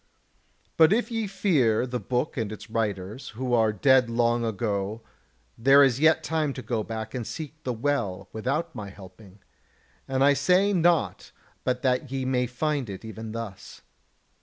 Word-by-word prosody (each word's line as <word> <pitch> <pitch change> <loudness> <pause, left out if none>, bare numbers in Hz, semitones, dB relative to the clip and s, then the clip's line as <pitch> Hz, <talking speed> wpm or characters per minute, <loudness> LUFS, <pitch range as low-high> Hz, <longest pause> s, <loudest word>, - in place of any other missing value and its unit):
But 160 +1 +6
if 240 +3 +1
ye 225 -2 -1
fear 145 - +2
the 125 -1 -3
book 125 +8 -2
and 110 -5 -2
its 105 +1 -10
writers, 105 +1 -3
who 125 -1 -2
are 110 -2 +4
dead 125 +3 +4
long 120 0 +1
ago, 105 -1 -2 0.6
there 135 +4 +7
is 135 -2 +2
yet 160 +1 +4
time 155 -3 -1
to 130 - -7
go 110 0 -1
back 110 0 -6
and 120 -3 -4
seek 155 -1 -7
the 125 - -2
Well 115 -7 -2
without 145 +9 -2
my 105 -5 -7
helping; 95 0 -15 0.6
and 135 0 +1
I 140 +1 +6
say 185 +7 +3
not 170 - +1 0.3
but 125 0 -1
that 130 +1 0
ye 135 -1 -2
may 125 -1 +1
find 135 0 -2
it 100 +2 -8
even 110 0 -7
thus. 115 -4 -8
125 Hz, 165 wpm, -26 LUFS, 110-145 Hz, 0.6 s, there